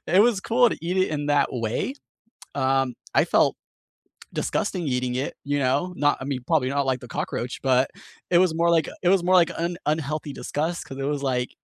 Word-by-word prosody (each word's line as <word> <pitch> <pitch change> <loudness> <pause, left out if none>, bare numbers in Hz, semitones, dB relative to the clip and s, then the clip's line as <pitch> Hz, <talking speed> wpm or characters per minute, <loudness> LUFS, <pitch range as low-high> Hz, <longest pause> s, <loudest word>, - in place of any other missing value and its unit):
it 185 +4 +5
was 225 -5 +2
cool 240 +3 +3
to - - -4
eat 180 +2 -2
it 185 0 +3
in 145 -1 -2
that 145 -1 +3
way. 115 - -2 0.6
Um, 135 -1 +1 0.2
I - - +5
felt - - +3 0.8
disgusting 180 - -1
eating 125 -1 -1
it, 130 +2 -2
you 145 0 0
know? 140 +8 0
Not 145 0 +2
I - - -4
mean, 135 -2 -3
probably 150 -6 +2
not 140 0 0
like 130 -1 0
the 125 - -11
cockroach, 120 +1 -4
but 130 0 +3 0.4
it 175 - +4
was 180 -3 +3
more 170 +1 +2
like 165 -2 +3 0.2
it 175 - +4
was 190 -2 +4
more 185 +1 +4
like 175 -2 +5
an 170 +1 -2
unhealthy 155 -1 -1
disgust 160 +6 -3
'cause 135 - -9
it - - -2
was 145 0 -2
like 125 -2 0
145 Hz, 210 wpm, -24 LUFS, 130-175 Hz, 0.8 s, it